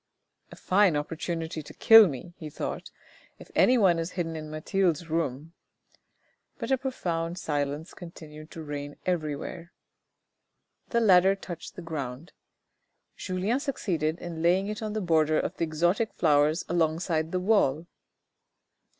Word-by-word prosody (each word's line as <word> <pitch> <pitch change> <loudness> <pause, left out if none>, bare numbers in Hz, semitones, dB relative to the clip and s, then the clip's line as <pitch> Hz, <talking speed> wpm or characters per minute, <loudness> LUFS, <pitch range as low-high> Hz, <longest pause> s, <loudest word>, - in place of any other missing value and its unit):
" - - -55
A - - -10
fine 190 -3 +3
opportunity 160 +2 -3
to 150 - -12
kill 225 -2 +8
me," 170 +4 -7
he 155 - -7
thought, 150 - -5 0.2
" - - -28
if - - -14
anyone 195 -9 +4
is 165 +2 -4
hidden 165 -3 -3
in 155 -1 -6
Mathilde's 165 +1 -1
room; 160 -1 -2 0.5
" - - -44
but - - -4
a 265 - +4
profound 175 -10 -3
silence 145 0 -3
continued 155 -3 -11
to 165 - -8
reign 145 -1 -6
everywhere. 170 0 -3 1.2
The 235 - +1
ladder 190 -2 +5
touched 175 -4 -9
the 180 - -8
ground. 150 -1 -6 0.8
Julien 190 +7 -1
succeeded 175 - -2
in 170 -2 -7
laying 185 +4 +2
it 210 +1 -5
on 215 -1 -3
the 215 - -2
border 155 -3 +2
of - - -3
the 165 - 0
exotic 175 +8 0
flowers 150 +1 +2
along 165 -2 +1
side 160 -3 -1
the 185 - 0
wall. 180 -6 +2
165 Hz, 150 wpm, -27 LUFS, 155-185 Hz, 1.2 s, kill